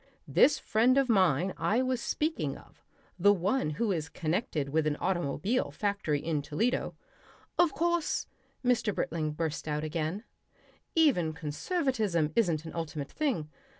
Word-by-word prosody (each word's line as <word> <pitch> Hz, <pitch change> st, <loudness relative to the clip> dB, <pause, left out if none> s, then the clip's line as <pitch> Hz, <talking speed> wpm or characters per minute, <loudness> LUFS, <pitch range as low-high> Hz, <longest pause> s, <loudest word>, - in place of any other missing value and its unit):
This 300 Hz, -, +5 dB
friend 240 Hz, +5 st, +3 dB
of 270 Hz, -2 st, +3 dB
mine 185 Hz, -, +3 dB
I 210 Hz, +10 st, +1 dB
was 255 Hz, -2 st, -1 dB
speaking 315 Hz, +2 st, -1 dB
of, -, -, -19 dB, 0.4 s
the 205 Hz, +3 st, +6 dB
one 200 Hz, +1 st, +1 dB
who 230 Hz, -3 st, +1 dB
is 155 Hz, -5 st, -2 dB
connected 160 Hz, -, -2 dB
with 155 Hz, +1 st, +1 dB
an 150 Hz, -, +1 dB
automobile 185 Hz, -, 0 dB
factory 200 Hz, -8 st, -1 dB
in 155 Hz, -1 st, -1 dB
Toledo 160 Hz, -, -1 dB, 0.3 s
" -, -, -28 dB
"Of 350 Hz, -3 st, +5 dB
course," 340 Hz, +3 st, 0 dB, 0.4 s
Mr. 235 Hz, -4 st, +2 dB
Britling 155 Hz, -2 st, -1 dB
burst 155 Hz, 0 st, -3 dB
out 150 Hz, 0 st, -1 dB
again, 160 Hz, +5 st, -2 dB, 0.7 s
"even 250 Hz, -, +3 dB
conservatism 170 Hz, -, -1 dB
isn't 170 Hz, -8 st, +1 dB
an 160 Hz, -, -7 dB
ultimate 155 Hz, -4 st, -4 dB
thing. 235 Hz, -, -1 dB
180 Hz, 145 wpm, -30 LUFS, 155-245 Hz, 0.7 s, the